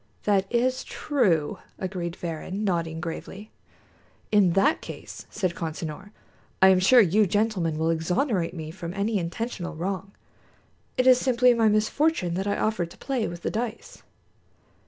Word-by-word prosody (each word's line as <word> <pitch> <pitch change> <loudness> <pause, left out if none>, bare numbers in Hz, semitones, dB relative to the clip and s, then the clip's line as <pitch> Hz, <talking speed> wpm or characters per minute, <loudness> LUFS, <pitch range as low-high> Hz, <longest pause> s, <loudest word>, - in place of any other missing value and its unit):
"That 195 -2 +1
is 255 +2 +1
true," 190 - 0 0.2
agreed 180 -3 -4
Varrin, 175 +4 -5
nodding 165 -4 -1
gravely. 190 +5 -7 0.8
"In 200 -5 +4
that 240 - +3
case," - - -9
said 185 -5 -2
Consinor, 160 +2 -5 0.5
"I 190 - +7
am 190 -1 +5
sure 240 +7 +7
you 205 +2 +3
gentlemen 195 -5 0
will 160 +1 +1
exonerate 180 - 0
me 160 -2 -6
from 170 0 -7
any 205 +1 0
intentional 175 0 -4
wrong. 190 +3 -4 0.8
It 255 - +2
is 255 -1 +7
simply 250 -1 +4
my 230 -2 +3
misfortune 215 - +1
that 190 +3 -2
I 200 - 0
offered 200 -6 -1
to - - -15
play 260 -5 -2
with 170 0 -8
the - - -1
dice." 225 +1 -5
195 Hz, 150 wpm, -26 LUFS, 170-220 Hz, 0.8 s, I